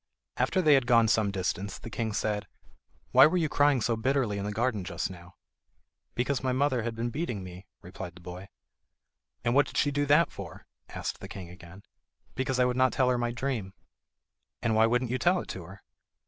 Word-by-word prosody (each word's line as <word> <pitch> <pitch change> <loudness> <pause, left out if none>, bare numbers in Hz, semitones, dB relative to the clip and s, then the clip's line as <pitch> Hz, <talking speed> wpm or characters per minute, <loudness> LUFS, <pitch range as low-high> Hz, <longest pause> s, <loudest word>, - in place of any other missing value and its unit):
After 185 - +1
they 155 -2 +6
had 135 -3 +3
gone 115 -2 +5
some 110 -1 +2
distance 95 0 -3
the 115 - -10
king 110 -1 -2
said: 105 0 -2 0.6
"Why - - +8
were 180 +4 0
you 165 -3 +2
crying 145 -3 +3
so 115 +1 +1
bitterly 120 -3 0
in 100 - -3
the 105 - -2
garden 110 -2 -1
just 95 +1 -3
now?" 90 0 -13 0.8
"Because 125 +3 0
my 130 0 0
mother 130 -1 +1
had 115 0 -3
been 120 +1 -2
beating 120 - -3
me," 90 +1 -10 0.2
replied 90 -1 -8
the - - -13
boy. 90 +2 -9 0.9
"And 120 - +1
what 145 +2 +4
did - - -7
she 145 - +2
do 145 0 0
that 150 +4 +4
for?" - - -9 0.2
asked - - -5
the - - -8
king 90 -3 -9
again. 90 +2 -13 0.5
"Because 130 0 -1
I 125 - +5
would 125 0 0
not 130 0 +3
tell 130 -1 +2
her 125 - +2
my 120 0 0
dream." 120 -6 -3 0.9
"And 115 - +2
why 110 +1 +5
wouldn't 125 +1 0
you 130 - -1
tell 175 +6 +3
it - - -10
to 90 -3 -6
her?" 95 +3 -13
115 Hz, 210 wpm, -28 LUFS, 100-130 Hz, 0.9 s, Why